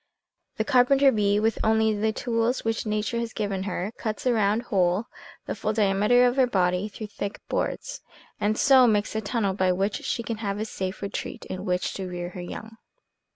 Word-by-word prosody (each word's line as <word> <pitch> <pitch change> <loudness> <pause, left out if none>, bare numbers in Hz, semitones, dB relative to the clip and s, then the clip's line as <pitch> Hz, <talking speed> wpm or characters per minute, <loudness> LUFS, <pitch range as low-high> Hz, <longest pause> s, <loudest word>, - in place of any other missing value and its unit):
The 220 - +1
carpenter 270 +3 +5
bee, 205 -2 +2
with 225 +1 +1
only 220 0 +3
the 220 +1 +1
tools 230 +1 -1
which 225 0 -1
nature 215 +2 -1
has 235 -1 -4
given 200 -2 -2
her, 185 +3 -3
cuts 215 +1 -4
a 250 - +3
round 215 +1 +2
hole, 190 -1 +1 0.4
the - - -3
full 215 - -2
diameter 210 +4 +4
of 245 +2 +1
her 260 -2 +5
body, 180 -2 +1
through 215 - -7
thick 205 0 -6
boards, - - -3 0.4
and 215 +1 +1
so 265 -3 +6
makes 210 -1 +1
a 220 - 0
tunnel 205 -2 -1
by 185 -1 +2
which 195 +3 -1
she 235 - -2
can 230 -1 -4
have 200 -2 -3
a 215 - -1
safe 190 -2 -5
retreat, 200 - -5
in 185 +1 -6
which 180 -1 -1
to 190 -1 -5
rear 175 0 -5
her 180 0 -8
young. 220 +5 -8
215 Hz, 200 wpm, -26 LUFS, 195-230 Hz, 0.4 s, so